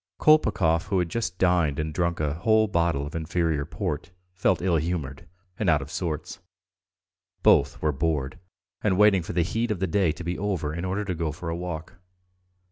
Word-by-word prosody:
Kolpakov, 85 - +3
who 95 - 0
had 90 -2 0
just 110 -3 -3
dined 90 -6 +2
and 75 0 -2
drunk 85 0 0
a 75 -2 0
whole 110 +6 +3
bottle 85 -7 0
of 75 - -8
inferior 80 -2 -1
port, 80 - -4 0.2
felt 90 0 +1
ill 90 -2 +1
humoured 80 -4 -3 0.3
and 105 - +1
out 80 -2 +4
of 70 - -11
sorts. 85 -3 -4 1.0
Both - - +4
were 75 - +3
bored 75 +1 -2 0.4
and 95 -4 +2
waiting 105 -2 +5
for 85 - -6
the 85 -1 +2
heat 115 +7 -1
of 105 -4 -1
the 95 - +1
day 95 -2 +2
to 80 - -8
be 85 +1 -3
over 90 -7 -2
in 85 +3 -4
order 100 +3 -2
to 95 - -2
go 80 -2 -2
for 80 +3 -6
a 85 - -2
walk. 85 -2 -6
85 Hz, 195 wpm, -26 LUFS, 80-95 Hz, 1.0 s, waiting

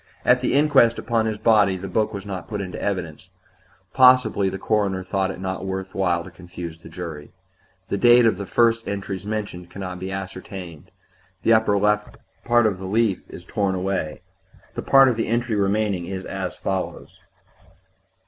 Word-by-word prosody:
At 125 0 +4
the 125 - 0
inquest 140 -5 +4
upon 115 -1 0
his 110 -1 -2
body 105 -3 +3
the 95 +1 -6
book 110 +2 0
was 100 -1 -7
not 95 -4 -6
put 105 0 -4
in 95 -2 -5
evidence; 90 -3 -4 0.6
possibly 125 -6 +5
the 95 - -5
coroner 100 -2 0
thought 95 0 -1
it 95 - -6
not 95 -1 -4
worth 95 0 -4
while 90 -3 0
to 90 - -11
confuse 85 -2 -9
the 80 - -13
jury. 80 -4 -8 0.6
The 100 - -1
date 120 +1 +6
of 110 -4 +2
the 100 - -5
first 115 +2 +3
of 115 - -26
the - - -1
entries 100 -1 -5
mentioned 100 -5 -4
can 100 - -9
not 90 -1 -5
be 95 +1 -5
ascertained; 95 -4 -7 0.5
the 115 - +5
upper 110 -2 +3 0.6
part 120 -1 +3
of 100 -4 0
the 95 - -6
leaf 105 -1 +1
is 85 - -10
torn 100 -1 -1
away; 90 -3 -3 0.5
the - - -4
part 135 0 +6
of 120 -3 +1
the 115 - -1
entry 120 0 0
remaining 100 -3 0
is 95 0 -5
as 95 -2 -4
follows 95 -1 -4
95 Hz, 185 wpm, -23 LUFS, 95-110 Hz, 0.6 s, date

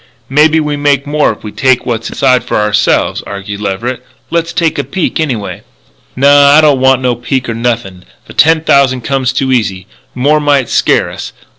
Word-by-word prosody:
"Maybe 155 +3 +3
we 150 -1 -2
make 145 -1 +1
more 150 -2 +1
if 105 - -11
we 105 - -7
take 130 0 +1
what's 115 -2 -3
inside 130 -2 +1
it - - -19
for - - -1
ourselves," 105 -1 +1
argued 100 +1 -7
Leverett. 115 +6 -4 0.3
"Let's 170 0 -1
take 165 -4 -1
a - - 0
peek, 185 +1 -3
anyway." 125 -10 -3 0.5
"Naw. 140 +2 +5
I - - +7
don't 145 -4 +3
want 130 0 +2
no 125 -1 +1
peek 125 +2 -3
nor 115 - -3
nothin'. 115 -6 -3 0.2
The - - -13
ten 160 +1 +3
thousand 135 -4 +2
comes 130 0 -1
too 130 0 -1
easy. 100 -7 -1 0.3
More 145 +5 +2
might 145 -4 +1
scare - - +1
us. - - -8
130 Hz, 190 wpm, -11 LUFS, 115-145 Hz, 0.5 s, I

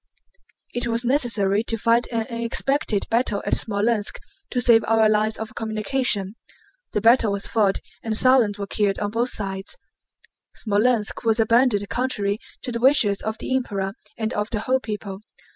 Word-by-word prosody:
It 240 0 -2
was 235 +1 -1
necessary 225 -7 +1
to 225 - -1
fight 230 +2 +2
an 225 -1 -1
unexpected 235 0 0
battle 225 -3 0
at - - -1
Smolénsk 210 0 0 0.3
to 250 - -1
save 235 -2 +5
our 220 0 +4
lines 215 0 +1
of 220 0 -6
communication. 220 -2 -1 0.6
The 210 - 0
battle 230 -1 +4
was 200 - -3
fought 205 -4 +1 0.2
and 220 -1 -2
thousands 245 -5 +4
were 200 - -4
killed 200 0 0
on 205 -1 -3
both 235 +3 0
sides. 195 - -1 0.8
Smolénsk 215 +1 +1
was 225 0 +2
abandoned 225 -2 +3
contrary 215 -5 -1 0.2
to 250 - -3
the 235 - -2
wishes 235 -7 +4
of 220 0 -4
the 260 - -2
Emperor 195 -7 -2 0.2
and 220 -1 -2
of 210 +1 -2
the 215 -3 -3
whole 260 +3 +1
people. 210 -4 -6
220 Hz, 160 wpm, -23 LUFS, 205-240 Hz, 0.8 s, save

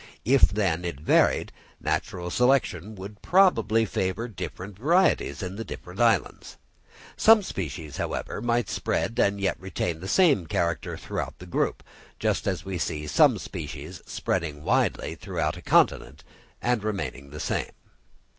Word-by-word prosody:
If, 135 +4 +4
then, 95 -4 0
it 85 -6 -4
varied, 75 - +3 0.3
natural 90 -1 -2
selection 110 - +1
would 100 +2 -9
probably 115 - +4
favour 95 +3 -2
different 95 -1 -7
varieties 170 - +2
in 95 +2 -5
the 115 - -3
different 90 -3 -9
islands. 115 -5 +1 0.6
Some 220 -1 +6
species, 80 - -5
however, - - -3
might 120 0 +1
spread 115 - -1
and 100 0 +2
yet 100 -1 0
retain 90 -3 -3
the 95 - -7
same 140 - +4
character 85 +1 -1
throughout - - -5
the 90 - -11
group, 90 - -1 0.3
just - - 0
as - - -2
we 95 -2 -3
see 75 -2 -2
some 75 - +4
species - - -7
spreading 80 -5 -2
widely 120 +6 +1
throughout - - -2
a - - -10
continent - - +2 0.4
and 120 -3 +1
remaining 75 -10 -4
the 75 +1 -8
same. - - -1
95 Hz, 145 wpm, -26 LUFS, 85-115 Hz, 0.6 s, Some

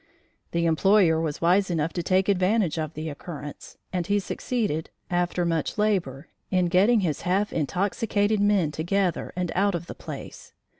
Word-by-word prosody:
The 170 0 0
employer 165 0 +4
was 155 -3 -3
wise 185 +4 +3
enough 165 -1 -1
to 175 - -2
take 185 +2 +2
advantage 185 -3 +2
of 155 0 -4
the 155 +1 -4
occurrence 150 -1 -8 0.2
and 175 -2 -1
he 205 - +2
succeeded, 205 -5 -2 0.2
after 175 0 0
much 165 +1 -1
labor, 180 -10 0 0.2
in 180 -2 +2
getting 205 +6 +4
his 160 -6 -1
half 190 +4 0
intoxicated 205 +6 0
men 200 -6 +2
together 175 +3 -1
and 180 -1 -2
out 200 0 +2
of 170 0 -4
the - - -7
place. - - -9
180 Hz, 160 wpm, -25 LUFS, 160-200 Hz, 0.2 s, employer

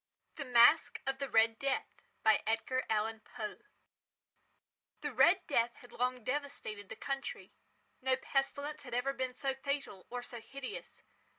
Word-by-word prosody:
The 285 - -5
Masque 245 +5 +6
of 270 0 -1
the 275 -1 -2
Red 225 0 +4
Death 275 -1 -2 0.2
by 220 -1 +5
Edgar 255 +4 0
Allan 220 +1 +1
Poe 220 -1 -6 1.4
The - - -3
"Red - - +5
Death" 235 -5 +2
had 245 - -15
long 250 0 -1
devastated 255 -7 -3
the - - -6
country. 275 +3 -4 0.5
No 260 0 +3
pestilence 285 +3 -1
had 245 -3 -6
ever 270 +3 +1
been 260 -2 -3
so 270 0 0
fatal, 270 -8 -4
or 245 0 -4
so 240 -1 -8
hideous. 275 - -8
255 Hz, 150 wpm, -34 LUFS, 225-275 Hz, 1.4 s, Masque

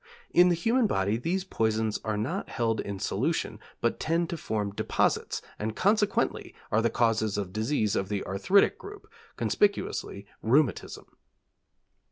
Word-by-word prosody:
In 180 +1 +6
the 175 - +3
human 230 +7 +2
body 100 - +1
these 175 +10 -1
poisons 110 - 0
are 110 -1 -1
not 110 +4 -3
held 115 -2 0
in 100 -1 -5
solution, - - -1 0.2
but 115 - 0
tend 165 +1 0
to - - -1
form 105 -7 -2
deposits - - 0 0.2
and 110 +1 -3
consequently 205 +1 +1 0.2
are 110 - +3
the 115 - +2
cause 110 -2 +1
of 95 -3 -4
diseases 110 -1 0
of 95 - -1
the 105 -1 -2
arthritic 180 - +3
group, 415 +1 -11 0.3
conspicuously 200 - 0 0.2
rheumatism. 135 +4 +1
115 Hz, 145 wpm, -28 LUFS, 105-175 Hz, 0.3 s, In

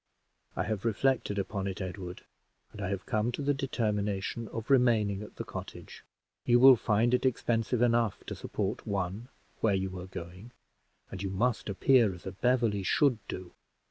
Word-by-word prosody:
"I - - 0
have 105 -2 -3
reflected 115 -1 +1
upon 100 0 -2
it, 95 +1 -4
Edward, 95 -1 -6 0.5
and 105 - -9
I 95 - -2
have 100 +1 -3
come 110 -1 0
to 145 - -3
the 145 +1 +2
determination 105 -5 -2
of 115 +5 -5
remaining 110 -6 +3
at 105 - -10
the - - -5
cottage. - - -9 0.4
You 120 0 +4
will 130 +1 +9
find 110 +2 +1
it 125 - +2
expensive 120 -1 +1
enough 115 -4 +1
to - - -5
support - - -4
one 100 +3 -2 0.3
where 105 -3 +2
you 95 -1 -3
are 90 - -7
going, 90 +6 -9 0.6
and 95 - -6
you 100 - -2
must 110 +4 0
appear 110 0 +4
as 90 - -15
a 95 - -4
Beverley 115 -1 +1
should 125 +5 +2
do. 90 -1 -7
105 Hz, 175 wpm, -30 LUFS, 95-120 Hz, 0.6 s, will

